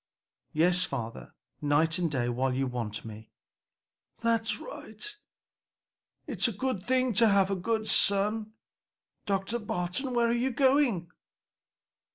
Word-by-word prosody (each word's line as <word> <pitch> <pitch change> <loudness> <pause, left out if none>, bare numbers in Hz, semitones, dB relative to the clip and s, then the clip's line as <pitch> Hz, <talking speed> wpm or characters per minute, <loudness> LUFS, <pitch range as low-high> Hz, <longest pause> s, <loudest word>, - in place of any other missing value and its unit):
"Yes, 175 +3 +3
father, 115 -4 -5 0.3
night 155 +4 +2
and 170 -2 +1
day 130 -5 -1
while 125 +2 0
you 135 +1 0
want 115 -4 -4
me." 110 0 -10 0.9
"That's 230 -1 +1
right! 420 -4 -8 1.1
It's - - +1
a - - -1
good 215 -1 -2
thing 255 +3 +1
to 225 +3 +5
have 200 -1 +3
a - - +1
good 220 +4 -1
son. 210 +2 +2 0.7
Dr. 200 +4 0
Barton, 210 +6 -2
where 235 -1 +3
are - - +2
you 240 +2 +1
going?" 260 - +2
195 Hz, 130 wpm, -29 LUFS, 150-235 Hz, 1.1 s, to